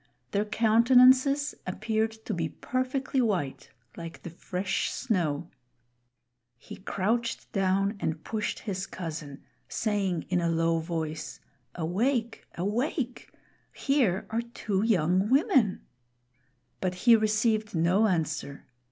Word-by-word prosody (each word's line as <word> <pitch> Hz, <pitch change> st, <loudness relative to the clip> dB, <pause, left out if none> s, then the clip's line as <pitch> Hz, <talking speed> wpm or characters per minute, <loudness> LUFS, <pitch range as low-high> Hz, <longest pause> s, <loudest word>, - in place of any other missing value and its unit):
Their 205 Hz, +1 st, +1 dB
countenances 255 Hz, +6 st, +5 dB
appeared 220 Hz, +4 st, 0 dB, 0.2 s
to -, -, -2 dB
be 165 Hz, -2 st, -1 dB
perfectly; 255 Hz, -, -1 dB
white, 185 Hz, -, -1 dB, 0.3 s
like 165 Hz, -1 st, -9 dB
the 175 Hz, -, -7 dB
fresh 180 Hz, +3 st, -2 dB
snow. 170 Hz, -, -1 dB, 1.1 s
He -, -, -11 dB
crouched 230 Hz, +5 st, -2 dB
down 195 Hz, +1 st, +1 dB
and 155 Hz, 0 st, -3 dB
pushed 220 Hz, -1 st, -3 dB
his 190 Hz, -3 st, -4 dB
cousin, 155 Hz, -5 st, -7 dB, 0.3 s
saying 190 Hz, 0 st, -1 dB
in 180 Hz, -1 st, +1 dB
a 170 Hz, -, +1 dB
low 165 Hz, 0 st, +2 dB
voice, 160 Hz, -2 st, -4 dB, 0.4 s
"Awake! 225 Hz, -, -1 dB
awake! 240 Hz, -, -2 dB, 0.4 s
here 250 Hz, -10 st, +1 dB
are 225 Hz, +1 st, 0 dB
two 220 Hz, -4 st, -2 dB
young 190 Hz, -2 st, +2 dB
women." 260 Hz, -6 st, +3 dB, 1.0 s
But 185 Hz, -1 st, -1 dB
he 235 Hz, -1 st, +9 dB
received 215 Hz, -1 st, +1 dB
no 180 Hz, +7 st, +3 dB
answer. 155 Hz, -6 st, -2 dB
200 Hz, 110 wpm, -28 LUFS, 170-230 Hz, 1.1 s, he